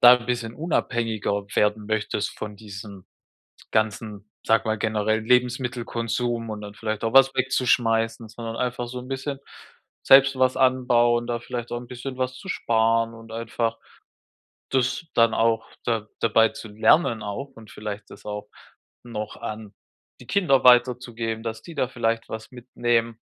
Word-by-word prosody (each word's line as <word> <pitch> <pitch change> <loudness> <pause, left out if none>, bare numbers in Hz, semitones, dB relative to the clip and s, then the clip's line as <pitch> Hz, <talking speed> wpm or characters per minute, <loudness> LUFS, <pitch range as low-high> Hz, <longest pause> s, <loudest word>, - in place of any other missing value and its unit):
da 120 0 +10
'n 120 -1 -5
bisschen 120 -2 -2
unabhängiger 115 - -1
werden 105 0 +1
möchtest 110 -1 -1
von 105 -1 -6
diesem 100 -2 -10 0.7
ganzen, 105 -1 -1 0.2
sage 110 0 +3
mal, 110 0 +1
generell 110 0 0
Lebensmittelkonsum 120 -1 0
und 105 -1 -5
dann 105 0 -9
vielleicht 110 0 -3
auch 115 - -1
was 135 0 +7
wegzuschmeißen, 115 -3 +1
sondern 115 0 -6
einfach 120 0 -2
so 125 +1 -6
'n 125 - -10
bisschen 135 +1 -4 0.6
selbst 135 0 +7
was 130 0 +3
anbauen, 120 -2 +3
da 120 -1 -1
vielleicht 120 0 -6
auch 120 - -2
'n 120 - -11
bisschen 125 +1 -7
was 130 0 -2
zu 190 - -11
sparen 115 -2 +1
und 115 0 -13
einfach 115 0 -2 0.9
das 130 +5 0
dann 115 -1 +5
auch 115 0 +2 0.2
da 115 -3 -1
dabei 115 0 +4
zu 110 - -9
lernen 110 +3 +3
auch 105 +7 -5
und 110 -2 -14
vielleicht 105 -1 -7
das - - -13
auch 105 0 -5 0.6
noch 110 -3 -6
an 110 -2 -7 0.5
die 125 - -13
Kinder 155 -5 +2
weiterzugeben, 120 -2 +3
dass 110 -1 -4
die 170 - -10
da 130 - +1
vielleicht 115 -2 -1
was 110 0 -7
mitnehmen. 120 -2 -1
115 Hz, 155 wpm, -24 LUFS, 110-125 Hz, 0.9 s, da